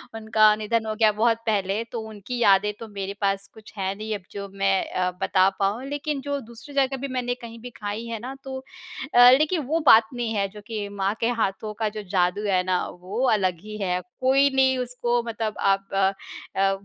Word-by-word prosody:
उनका 215 -1 +4
निधन 220 +1 -1
हो 215 0 -2
गया 215 -1 +4
बहुत 225 +2 +2
पहले 205 -1 0
तो 235 - -3
उनकी 215 +4 -6
यादें 205 -2 +4
तो 230 - -7
मेरे 200 -1 -5
पास 195 0 0
कुछ 220 -1 -15
है 190 0 -1
नहीं 215 0 -4
अब 205 - -7
जो 200 0 -6
मैं 195 -1 +1
अ, 180 0 0
बता 190 0 +4
पाऊँ। 205 +6 0
लेकिन 290 0 -3
जो 285 +1 -2
दूसरी 235 +5 -12
जगह 270 -1 +1
भी 275 - -2
मैंने 245 -1 -1
कहीं 230 0 -10
भी 245 - -7
खाई 205 +2 -4
है 230 -1 -4
ना 255 +4 -7
तो 265 -1 -5 0.6
अ, 245 0 +10
लेकिन 310 +2 +1
वो 320 +4 +1
बात 220 -4 +7
नहीं 240 -2 -2
है, 200 -1 +1
जो 210 +1 -12
कि 215 -3 -4
माँ 200 0 -1
के 230 - +1
हाथों 210 +2 -2
का 220 -1 +1
जो 210 0 -7
जादू 180 +2 +1
है 185 -2 +2
ना 185 -1 0 0.2
वो 200 +7 -3
अलग 185 -5 +1
ही 215 0 -7
है। 180 -2 0 0.2
कोई 270 +2 +4
नहीं 265 -1 +4
उसको 245 -1 -1
मतलब 225 -2 -3
आप 195 0 +2
अ 195 0 +3 0.5
अ, 195 0 +4
215 Hz, 215 wpm, -24 LUFS, 195-245 Hz, 0.6 s, अ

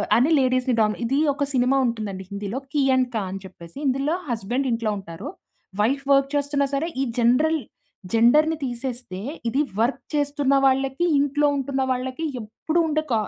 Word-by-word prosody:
అని 250 +6 +4
లేడీస్‌‌ని 255 -1 +2
డం 215 0 +3
ఇది 270 +5 +1
ఒక 285 - -2
సినిమా 255 +1 +3
ఉంటుందండి 210 -5 -3
హిందీలో. 200 +5 -4
'కీ 295 - +1
అండ్ 255 -1 +2
క' 220 - +1
అని 195 +1 -6
చెప్పేసి 170 +2 -13
ఇందులో 275 +4 +1
హస్బెండ్ 240 +4 -1
ఇంట్లో 230 -2 0
ఉంటారు. 165 -4 -8 0.5
వైఫ్ 270 +6 +1
వర్క్ 275 0 +3
చేస్తున్నా 285 0 +1
సరే 295 +4 0
ఈ - - +2
జనరల్ 275 +7 +3 0.5
జెండర్‌‌ని 300 +8 +4
తీసేస్తే 240 -6 -5 0.3
ఇది 275 +5 +1 0.2
వర్క్ 240 +4 +1
చేస్తున్న 285 -1 +1
వాళ్ళకి 270 +4 +2
ఇంట్లో 290 +1 +2
ఉంటున్న 270 0 -2
వాళ్ళకి 255 +5 -2 0.2
ఎప్పుడు 310 +10 -2
ఉండే 310 0 0
క - - +3
260 Hz, 160 wpm, -23 LUFS, 230-280 Hz, 0.5 s, అని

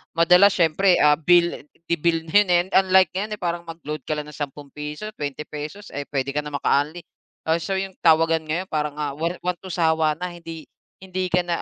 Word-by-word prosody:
madalas 180 +4 +5
siyempre, 175 +2 +3
ah, 150 0 +5
bil 170 -2 +2 0.2
bibilhin, 170 +4 +2
eh, 175 -1 +3
unlike 190 0 +5
ngayon, 210 +3 -3
eh, - - -23
parang 170 -1 -3
mag-load 155 -2 -6
ka 155 - -1
lang 150 - -4
ng - - -13
sampung 145 -1 -6
piso, 150 +8 -6
bente 145 0 -4
pesos, 150 +7 -8
eh, 145 0 -5
puwede 135 -1 -2
ka 145 - -1
na 150 - -7
maka-unli. 150 +4 0 0.4
Ah, 165 +1 +1
so 195 +2 -2
yung 190 0 -4
tawagan 165 0 +4
ngayon 160 +4 -3
parang, 150 -2 -3
ah, 145 -2 -2
1- 170 +4 -2
1 180 0 0
to 190 - -8
sawa 160 -3 +1
na 180 - -3
hindi 165 -2 -10 0.3
hindi 185 -1 -4
ka 180 - +2
na, 170 -1 -2
165 Hz, 200 wpm, -23 LUFS, 150-180 Hz, 0.4 s, madalas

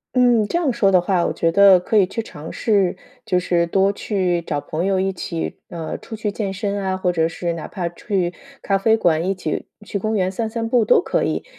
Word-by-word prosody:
嗯， 245 -3 +4
这 345 - +1
样 280 -8 +1
说 195 -4 +3
的 185 - +5
话， 175 -1 +1
我 - - 0
觉 165 0 0
得 200 -1 +7
可 180 - -3
以 195 - +6
去 210 +5 -4
尝 160 -7 -9
试 195 -5 +1 0.3
就 180 -5 +1
是 175 -1 +1
多 195 +3 +2
去 185 -5 -1
找 150 -3 -3
朋 155 +3 -4
友 195 0 +1
一 195 0 0
起， 170 -2 -4
呃， 165 -2 -5
出 220 - -8
去 210 -1 -3
健 200 -3 -3
身 200 +1 -2
啊， 190 0 -1
或 180 -1 0
者 165 -1 +1
是 170 +1 -3
哪 165 - -7
怕 180 -3 -3
去 180 0 -2 0.3
咖 195 - +1
啡 220 +3 +3
馆、 165 -4 +2
一 - - +2
起 180 -5 -4 0.2
去 200 - -3
公 215 +2 -1
园 185 -1 +1
散 220 +4 -3
散 225 0 -3
步 235 0 +3
都 210 - +4
可 - - 0
以。 - - -2
190 Hz, 255 characters per minute, -21 LUFS, 175-210 Hz, 0.3 s, 得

